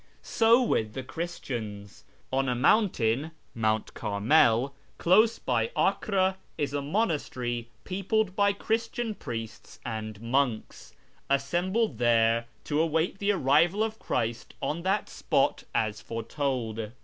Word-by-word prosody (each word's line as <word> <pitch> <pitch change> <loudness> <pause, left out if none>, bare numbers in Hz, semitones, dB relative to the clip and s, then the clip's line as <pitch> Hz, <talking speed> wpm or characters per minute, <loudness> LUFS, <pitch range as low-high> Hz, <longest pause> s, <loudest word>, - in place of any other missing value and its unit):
So 230 +2 +4
with 110 - 0
the 130 - -5
Christians. 120 - -6 0.3
On 135 0 +1
a 125 - +1
mountain 135 - +2 0.3
^ 110 +3 +2 0.3
close 215 +6 +4
by 115 -3 0
Acre 190 -1 +1 0.2
is 145 -1 -2
a 145 - -1
monastery 140 - -1
peopled 195 +1 -1
by 200 0 +4
Christian 225 +2 -2
priests 115 - -7
and 110 -3 -5
monks, 120 0 -2 0.3
assembled 175 - 0
there 115 -1 +3 0.2
to 150 +1 0
await 165 +3 0
the 200 +1 +2
arrival 170 +4 +3
of 220 0 -3
Christ 115 0 -3
on 160 +3 -2
that 195 +4 0
spot - - 0
as 110 -1 0
foretold. 115 -2 -3
140 Hz, 115 wpm, -28 LUFS, 115-190 Hz, 0.3 s, So